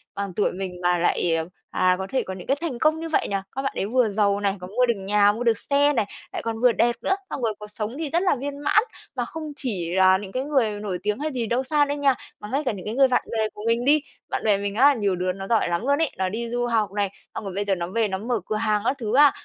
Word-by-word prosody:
bằng 200 -2 -4
tuổi 210 - +2
mình 180 -1 -6
mà 175 0 +2
lại, 170 0 +1
ờ, 160 0 -1 0.3
à, 185 0 +3
có 190 - -3
thể 265 - 0
có 190 - -6
những 180 -1 -9
cái 275 +2 +2
thành 295 -8 -3
công 310 +3 +3
như 330 0 -5
vậy 320 - +1
nhỉ? 200 - -2 0.2
Các 270 - -1
bạn 270 - -2
ấy - - -1
vừa 240 +1 +2
giàu 200 -1 +2
này, 200 -1 0
còn 180 - -7
mua 250 +1 +4
được 235 - +2
nhà, 205 +1 +3
mua 225 +4 -4
được 230 -2 +3
xe 285 +4 +2
này, 225 -6 +1 0.3
lại - - -3
còn 225 -1 -3
vừa 245 +1 +5
đẹp 235 +1 +2
nữa, 385 - +1
xong - - -4
rồi 225 -2 0
cuộc 210 - -8
sống 215 +3 -4
thì 320 -3 -2
rất 340 +5 +1
là 370 - +3
viên 280 +2 -5
mãn." 420 +9 +3 0.3
Mà - - -1
không 320 -5 -7
chỉ 195 - -3
là 190 0 +6
những 195 -1 -8
cái 255 +4 -2
người 270 -7 +1
nổi 195 -4 -3
tiếng 210 +4 -1
hay 310 +1 -2
gì 245 -4 -2
đâu 240 +4 0
xa 290 +2 +3
đâu 285 +1 -2
nha, 275 -2 +3 0.2
mà 210 - -8
ngay 280 +3 0
cả - - +2
những 195 -4 -8
cái 215 - -3
người 270 0 +6
bạn 255 - +1
bè 220 -1 0
của 210 - -9
mình 230 +1 +1
đi, 295 +2 +5 0.3
bạn - - -2
bè 210 -2 +4
mình 200 0 -3
á, 280 +5 +6
nhiều 205 -7 0
đứa 180 +1 -1
nó 195 0 -7
giỏi 225 -6 +2
lắm 170 +2 0
luôn 280 +1 +3
ấy, 320 - +1
nó 185 0 0
đi 230 +3 -4
du 245 +1 -1
học 220 -4 +1
này, 205 -1 0 0.3
xong - - -4
rồi 195 -2 -5
bây 205 +1 -1
giờ 195 -1 +1
nó 170 -1 -3
về 220 +4 +1
nó 190 -1 -2
mở 230 +3 -1
cửa 215 - -2
hàng 215 -1 +1
các 270 - +2
thứ 220 -1 -1
á, 290 0 +7
225 Hz, 310 wpm, -24 LUFS, 200-265 Hz, 0.3 s, á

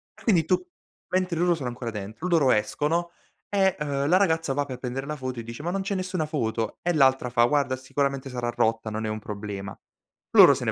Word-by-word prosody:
E - - -17
quindi 180 -9 +3
tu 185 - +1 0.4
mentre 185 -2 0
loro 175 0 +3
sono 140 -6 -5
ancora 120 -1 -5
dentro, 105 - -6
loro 160 -7 +4
escono 150 +11 0 0.4
e, 195 -2 +2
uhm, 140 -2 -1
la 180 +4 +5
ragazza 160 -7 +2
va 145 +1 0
per 130 -3 -6
prendere 130 +2 -4
la 150 - -3
foto 130 -2 -4
e - - -10
dice: 115 +4 -8
"Ma 175 - -1
non 195 +1 -1
c'è 195 +1 -2
nessuna 185 -3 -2
foto." 115 -7 -2
E 175 - +1
l'altra 135 -4 +3
fa: 120 -1 +3
"Guarda 140 0 +1
sicuramente 135 +1 -2
sarà 120 -2 -3
rotta, 115 -2 0
non 110 +1 -3
è - - -2
un 110 0 -3
problema." 100 -1 -6 0.5
Loro - - +9
se - - -4
ne - - +1
135 Hz, 225 wpm, -26 LUFS, 120-170 Hz, 0.5 s, Loro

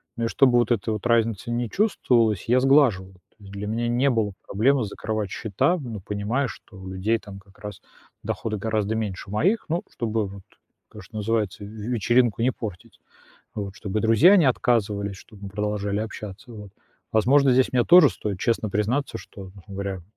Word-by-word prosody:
Ну, 115 - -2
и - - +1
чтобы 130 +2 +3
вот 120 0 +2
этой 115 -1 0
вот 110 -1 -3
разницы 115 -2 +1
не 120 -1 -2
чувствовалось, 120 - +1
я 125 +1 +5
сглаживал. 125 -9 +3
То 90 - -28
есть 100 - -12
для 100 +1 -6
меня 115 +2 -1
не 125 +4 +2
было 110 -5 0
проблемой 125 +4 +2
закрывать 110 0 -4
счета, 110 - 0
ну, 120 - -7
понимая, 105 +7 -2
что 105 - -12
у 95 - -10
людей, 105 +5 0
там, 100 -3 -11
как 95 0 -22
раз 105 0 -8 0.4
доходы 110 -2 -3
гораздо 110 0 -1
меньше 100 -3 -4
моих. 185 - +1
Ну, 170 +2 -1
чтобы, 110 -2 -2
вот, 100 0 -10 0.5
то, 105 - -11
что 100 +4 -11
называется, 105 -2 -1
"в - - -7
вечеринку 115 +1 0
не 125 +3 +3
портить". 105 -8 -8 0.6
Вот. 100 -2 -5
Чтобы 105 0 -3
друзья 130 - +6
не 170 - +4
отказывались, 105 -6 0
чтобы 100 +1 -14
мы - - -5
продолжали 105 0 -2
общаться, 110 +1 -8
вот. 105 -3 -10 0.4
Возможно, 135 +5 +4
здесь 130 +1 +3
мне 125 -2 +3
тоже 180 +1 +7
стоит 100 -3 -5
честно 110 +1 0
признаться, 110 +8 -1
что, 95 -2 -11 0.2
говоря, 100 -1 -4
н 90 - -12
110 Hz, 185 wpm, -24 LUFS, 100-120 Hz, 0.6 s, тоже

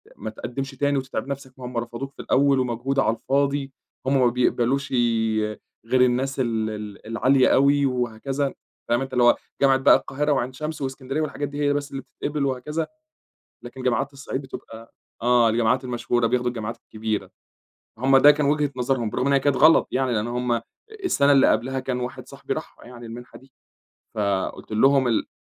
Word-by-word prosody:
ما 110 - -6
تقدِّمش 130 +5 -5
تاني 145 +1 0
وتتعب 130 -2 -4
نفسك 135 -2 -6
ما 125 - -7
هُم 125 -1 -6
رفضوك 120 +4 -5
في - - -9
الأول 140 -1 +3
ومجهود 125 +2 -1
على 115 -3 +2
الفاضي، 140 +2 -1 0.3
هُم 135 +1 +2
ما 125 - +5
بيقبلوشِ 125 +3 0 0.9
غير 125 +2 +2
الناس 130 +2 +1
ال 115 -3 0
ال 105 -1 -8
العالية 130 +4 +3
أوي 140 +1 +4
وهكذا، 130 +2 -2 0.4
فاهم 120 +2 +2
أنت 135 -1 -5
اللي 125 -1 +3
هو 120 - +6 0.3
جامعة 135 -1 +5
بقى 135 - +6
القاهرة 150 +2 -1
وعين 130 -2 0
شمس 155 +2 -5
واسكندرية 135 +2 -3
والحاجات 145 -1 -3
دي 145 +1 -7
هي 145 0 +2
بس 145 0 -3
اللي 135 - -5
بتتقبل 145 0 -4
وهكذا. 150 +5 -2 0.8
لكن 130 +2 -9
جامعات 130 +3 0
الصعيد 140 0 -5
بتبقى 115 -4 -11 0.3
آه 120 -1 +4
الجامعات 120 +3 +1
المشهورة 120 -1 0
بياخدوا 125 +1 +1
الجامعات 115 -1 -4
الكبيرة، 110 -1 -4 0.7
هُم 135 +3 +4
ده 145 +2 +8
كان 145 -1 +2
وجهة 145 -1 +1
نظرهم 125 -3 0
برغم 125 - -1
أن 140 - +2
هي 140 - +4
كانت 140 -1 +1
غلط 160 +1 +5
يعني، 130 -1 0
لأن 110 0 0
هُم 120 -1 -1 0.4
السنة 145 - +3
اللي 135 -1 +6
قبلها 130 +3 0
كان 130 -1 -3
واحد 125 0 -6
صاحبي - - -6
راحها - - -8
يعني 120 -1 -10
المنحة 120 +2 -10
دي، 130 0 -22 0.6
فقُلت 100 0 -2
لهم 135 +4 +4
ال 115 - 0
130 Hz, 180 wpm, -24 LUFS, 120-140 Hz, 0.9 s, ده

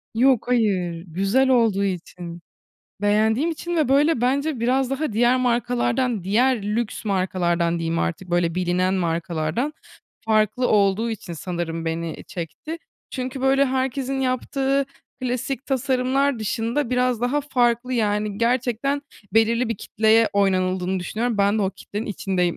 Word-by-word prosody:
Yok 250 0 +3
hayır, 185 -8 0
güzel 195 +11 +1
olduğu 225 -6 +3
için, 175 -2 -5 0.6
beğendiğim 220 +9 +2
için 345 +2 -4
ve 310 -6 +2
böyle 280 -1 +3
bence 275 +1 0
biraz 255 +2 +1
daha 270 -2 -2
diğer 240 +3 +3
markalardan, 245 -2 0
diğer 230 +3 +2
lüks 215 +2 -2
markalardan 175 -3 0
diyeyim 165 0 -1
artık, 175 +2 -3
böyle, 175 -1 +1
bilinen 180 +1 +1
markalardan 170 - -1 0.5
farklı 215 +3 +2
olduğu 210 +2 +2
için 195 -5 -6
sanırım 165 -1 -4
beni 165 0 -4
çekti. 180 - -6 0.3
Çünkü, 255 +1 -4
böyle, 270 +1 +4
herkesin 265 +1 -1
yaptığı 270 +2 0 0.4
klasik 255 +2 -2
tasarımlar 265 0 +1
dışında 230 +4 -1
biraz 250 -2 +1
daha 250 +4 +1
farklı, 250 -3 +1
yani, 210 -3 0
gerçekten 250 +4 0 0.3
belirli 230 +2 +3
bir 230 - -2
kitleye 220 +3 +3
oynanıldığını 185 -1 +1
düşünüyorum. 225 +5 -2
Ben 200 +2 +3
de - - +1
o 190 - +1
kitlenin 205 +3 -6
içindeyim. 185 -4 -1
225 Hz, 135 wpm, -23 LUFS, 190-255 Hz, 0.6 s, böyle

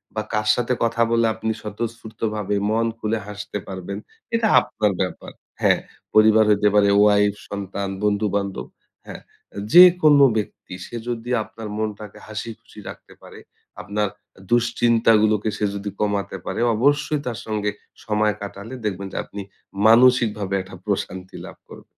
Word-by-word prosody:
বা 110 - 0
কার 105 0 0
সাথে 125 +1 0
কথা 115 0 0
বলে 115 0 +3
আপনি 110 0 -2
স্বতঃস্ফূর্তভাবে 110 -1 -4
মন 115 +1 +1
খুলে 110 +1 -1
হাসতে 105 0 -6
পারবেন? 95 +1 -6 0.4
এটা 230 -1 +2
আপনার 105 -1 -1
ব্যাপার। 95 - -4 0.3
হ্যাঁ, - - +4 0.4
পরিবার 110 0 +6
হইতে 105 0 +3
পারে, 100 -1 +5
ওয়াইফ, 105 -1 +4 0.2
সন্তান, 100 0 -4
বন্ধু-বান্ধব, 100 - -1 0.4
হ্যাঁ। - - -9 0.5
যেকোনো 170 -5 +8
ব্যক্তি, 100 -3 -5
সে - - -10
যদি 120 0 -4
আপনার 110 0 -10
মনটাকে 105 -1 -5
হাসিখুশি 110 0 -8
রাখতে - - -12
পারে, - - -13 0.4
আপনার 105 0 -1 0.4
দুশ্চিন্তাগুলোকে 115 -3 +3
সে 105 - 0
যদি 100 +1 -4
কমাতে 100 -1 -1
পারে, - - -4 0.2
অবশ্যই 145 +5 +1
তার 120 -3 -4
সঙ্গে 105 -2 -2 0.3
সময় 105 -1 +1
কাটালে 100 +4 -7
দেখবেন 100 -1 -3
যে, - - -5
আপনি 100 - -8 0.5
মানসিকভাবে 115 -4 +4
একটা 95 0 -11
প্রশান্তি 95 -2 -4
লাভ - - -11
করবেন। - - -13
105 Hz, 135 wpm, -22 LUFS, 100-115 Hz, 0.5 s, যেকোনো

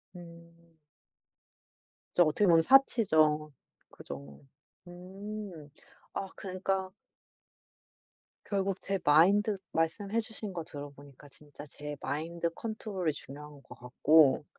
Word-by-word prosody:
음. 170 -1 -15 1.4
진짜 175 - +6
어떻게 160 +6 +2
보면 165 -2 +6
사치죠. 160 - +4 0.4
그죠. 70 0 -10 0.5
음. 185 -2 -8 0.4
아 195 - -3
그니까 190 0 -3 1.5
결국 195 -1 -1
제 195 0 -1
마인드 195 +8 +4 0.2
말씀해 195 +7 0
주신 220 -2 -4
거 170 -2 -4
들어보니까 145 -2 -10
진짜 145 +1 -13
제 145 0 -8
마인드 170 +3 -2
컨트롤이 210 -5 -3
중요한 145 0 -11
것 - - -13
같고 145 +4 +4
170 Hz, 210 characters per minute, -30 LUFS, 150-195 Hz, 1.5 s, 진짜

